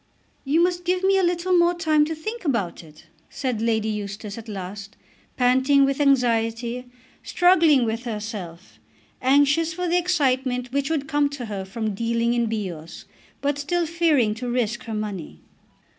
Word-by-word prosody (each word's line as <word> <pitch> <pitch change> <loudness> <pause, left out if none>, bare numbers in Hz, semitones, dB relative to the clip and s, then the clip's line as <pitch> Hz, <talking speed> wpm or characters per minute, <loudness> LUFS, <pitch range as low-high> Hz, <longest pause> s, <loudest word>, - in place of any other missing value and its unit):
"You 310 +5 +2
must 355 0 0
give 365 +1 0
me 385 0 +4
a - - +1
little 355 +1 +1
more 345 0 +4
time 310 -3 +2
to 320 +1 -4
think 435 +9 -6
about 230 - -1
it," 155 -1 -17 0.2
said 250 -5 -3
Lady 220 -1 +1
Eustace 205 -1 -5
at 230 0 -10
last, 195 +1 -7 0.4
panting 260 +3 +4
with 275 +1 -1
anxiety, 240 -2 +1 0.3
struggling 330 -8 +4
with 225 +2 -3
herself, 210 -6 -7 0.4
anxious 285 +5 +3
for 360 0 -2
the 350 +1 +3
excitement 260 -8 0
which 280 0 0
would 295 -4 -1
come 290 -2 +1
to 285 -4 -6
her 200 -3 -5
from 215 +2 -3
dealing 230 +2 0
in 235 -1 +1
Bios, 185 -8 -5 0.4
but 285 0 -1
still 345 +4 0
fearing 310 -9 +2
to 245 +3 -5
risk 240 0 -1
her 225 -1 -4
money. 195 - -6
250 Hz, 160 wpm, -23 LUFS, 220-315 Hz, 0.4 s, me